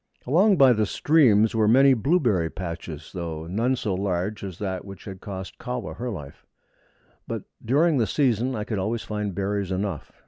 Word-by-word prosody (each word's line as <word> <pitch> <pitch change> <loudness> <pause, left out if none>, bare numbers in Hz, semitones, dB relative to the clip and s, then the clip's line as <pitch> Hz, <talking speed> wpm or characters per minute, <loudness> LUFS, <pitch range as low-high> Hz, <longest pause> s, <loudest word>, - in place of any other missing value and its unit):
Along 185 - +4
by 135 -4 +7
the 110 -2 +1
streams 115 -7 +4
were 110 -2 +2
many 135 +4 +6
blueberry 120 - +1
patches, 85 -3 -7
though 80 -3 -5
none 115 +9 0
so 105 -5 -2
large 95 +2 -2
as 95 -4 -6
that 95 -3 -3
which 100 -2 -11
had 95 -2 -8
cost 95 -2 -7
Kahwa 125 -3 -5
her 125 +1 -3
life; 75 -10 -8 0.8
but - - -4 0.2
during 145 +5 +3
the 115 - +2
season 130 +1 +1
I 105 - -2
could 110 -2 -3
always 110 +4 -2
find 105 -3 -4
berries 100 -1 -2
enough. 95 -4 -3
105 Hz, 175 wpm, -25 LUFS, 95-125 Hz, 0.8 s, by